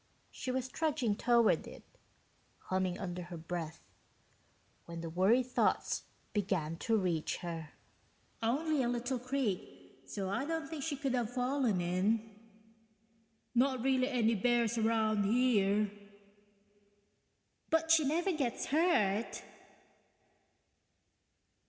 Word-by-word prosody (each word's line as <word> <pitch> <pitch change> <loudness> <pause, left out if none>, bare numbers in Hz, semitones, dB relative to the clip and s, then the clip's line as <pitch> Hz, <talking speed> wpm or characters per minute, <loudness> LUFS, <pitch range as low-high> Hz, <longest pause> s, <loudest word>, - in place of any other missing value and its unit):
She - - -6
was 255 0 -1
trudging 280 -7 0
toward 235 0 +3
it, - - -11 0.7
humming 185 -1 -1
under 180 -2 -4
her 175 0 -7
breath, 165 -1 -5 1.0
when 170 -1 -7
the 165 -1 -5
worry 195 +9 +4
thoughts 250 0 0 0.3
began 185 -6 -1
to 225 +5 +1
reach 175 -6 -1
her. 165 -3 -5 0.3
(... - - -37
only 285 +6 +1
a 240 - +1
little 245 +1 -1
creek 205 - -3
so 195 +4 -4
I 200 +7 -1
don't 325 +1 -2
think 315 -2 -6
she 295 +1 -2
could 270 -1 -2
have 240 -2 0
fallen 250 -4 +1
in... 205 +5 0 1.2
not 255 0 +2
really 260 -1 +3
any 235 -4 +2
bears 235 +1 +2
around 220 -2 +2
here... 210 -3 +3 1.8
but 325 0 +2
she 325 -1 +6
never 335 +7 +1
gets 275 -8 -1
hurt 235 - +1
230 Hz, 115 wpm, -33 LUFS, 190-260 Hz, 1.8 s, she